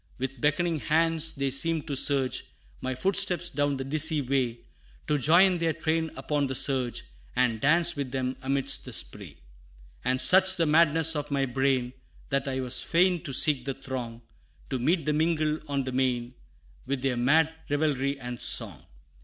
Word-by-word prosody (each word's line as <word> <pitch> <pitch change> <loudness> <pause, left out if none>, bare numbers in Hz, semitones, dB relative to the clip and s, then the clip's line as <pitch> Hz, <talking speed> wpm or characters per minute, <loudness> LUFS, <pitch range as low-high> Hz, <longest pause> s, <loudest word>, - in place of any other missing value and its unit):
With 130 -1 -5
beckoning 160 +2 0
hands 160 +1 0
they 140 -1 -2
seemed 165 +3 +2
to 140 - -4 0.2
urge 130 -3 -1 0.4
My 130 0 -3
footsteps 180 +1 +1
down 145 0 -1
the 135 - -4
dizzy 155 +3 +2
way, 130 -3 -2 0.4
To 150 -1 0
join 175 +6 +4
their 165 -1 0
train 160 +1 -1
upon 145 -2 -2
the 130 - -4
surge, 130 -3 +1 0.3
And 125 -3 0
dance 170 +4 +4
with 140 -3 -4
them 130 0 -3
amidst 135 0 0
the - - -8
spray: - - -3 0.7
And 130 +1 0
such 185 +8 +6
the 165 - +2
madness 160 +1 +3
of 150 0 -4
my 140 -1 0
brain, 130 -1 -1 0.4
That 140 0 -1
I 130 -1 -2
was 125 -1 0
fain 175 0 +1
to 140 - -7
seek 135 -1 +3
the 135 -1 -3
throng; 120 -3 -7 0.5
To 130 - -1
meet 160 +6 0
and 150 0 +1
mingle 155 -1 0
on 140 -1 -2
the 130 - -5
main, 125 -1 -1 0.5
With 135 -1 -3
their 135 -2 0
mad 150 +6 +2 0.2
revelry 145 -2 -1
and 125 -1 -7
song. - - -2
140 Hz, 170 wpm, -27 LUFS, 130-160 Hz, 0.7 s, such